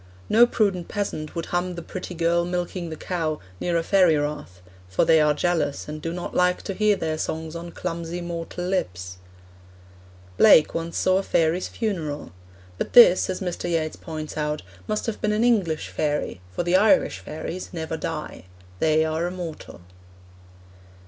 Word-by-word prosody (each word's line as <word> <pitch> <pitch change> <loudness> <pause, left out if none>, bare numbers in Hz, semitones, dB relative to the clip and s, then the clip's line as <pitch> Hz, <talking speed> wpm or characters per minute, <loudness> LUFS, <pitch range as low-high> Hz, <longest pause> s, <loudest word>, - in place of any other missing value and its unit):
No 235 +2 +6
prudent 195 -7 0
peasant 180 -7 -4
would 165 - -3
hum 175 0 0
The 170 - -6
Pretty 180 0 -7
Girl 170 +1 +2
Milking 175 0 -3
the 160 - -5
Cow 160 -2 -2 0.2
near 175 -1 0
a 165 - 0
fairy 180 -4 +4
rath, 145 -11 -4 0.3
'for 95 - +2
they 160 -1 +5
are 150 -1 +3
jealous, 165 -3 0
and 150 0 -6
do 165 - -3
not 175 +1 -5
like 180 0 +2
to 195 - -3
hear 210 +1 +3
their 160 -4 -2
songs 160 0 -3
on 170 +1 -6
clumsy 170 0 -4
mortal 170 0 -5
lips.' 90 - -3 1.2
Blake 150 - +7
once 165 0 -3
saw 185 0 +3
a - - 0
fairy's 170 -1 +1
funeral. 160 - -3 0.5
But - - -3
this, 190 -8 +8
as 185 - -3
Mr. 175 -1 -3
Yeats 160 -2 -1
points 155 -2 -7
out, 150 0 -2 0.2
must 215 0 -1
have 225 - -4
been 210 0 +1
an 215 +2 +1
English 195 -10 +1
fairy, 150 - -2
for 90 - -2
the 175 +1 +2
Irish 220 +8 +3
fairies 165 +4 -6
never 160 -2 -4
die; 155 - -5 0.3
they 155 0 +3
are 160 +2 -1
immortal. 175 - -7
170 Hz, 170 wpm, -24 LUFS, 155-180 Hz, 1.2 s, this